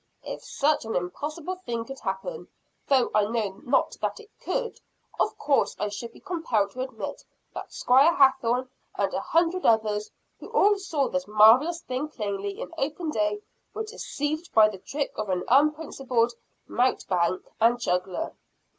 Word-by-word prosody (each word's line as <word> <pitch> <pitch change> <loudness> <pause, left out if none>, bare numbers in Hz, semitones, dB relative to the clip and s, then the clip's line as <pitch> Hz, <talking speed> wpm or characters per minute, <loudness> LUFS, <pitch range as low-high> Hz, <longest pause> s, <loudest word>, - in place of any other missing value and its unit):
"If - - -6
such 295 +1 +1
an 225 0 -4
impossible 300 - -3
thing 235 -10 -4
could 270 +1 -8
happen, 195 - -4 0.4
though 265 -3 +3
I 210 -1 +4
know 215 -3 -2 0.4
that - - -2
it 435 -1 -15
could - - -4 0.2
not, - - -23 0.4
of - - +1
course 280 -1 +1
I 210 - -1
should 220 +3 -6
be - - -16
compelled 245 - -1
to 255 - -6
admit 260 - -5 0.3
that - - -7
Squire 275 +7 +4
Hathorne 260 -2 +3 0.3
and - - 0
a - - 0
hundred 345 +2 +1
others, 215 -2 +2 0.3
who - - -9
all 410 0 +4
saw 315 -7 0
this 275 0 -2
marvelous 235 +11 +6
thing 260 +4 -3
plainly, 200 -6 -4
in - - -6
open 305 +3 -2
day, 210 -3 0 0.3
were 440 - -2
deceived 315 -7 -4
by 215 -1 +7
the 200 -3 -8
trick 285 +8 -3
of 215 -2 -3
an 180 -1 0
unprincipled 270 -4 +2 0.3
mountebank 185 -7 +1
and 235 +2 +4
juggler." 180 -4 -1
250 Hz, 160 wpm, -26 LUFS, 210-305 Hz, 0.4 s, by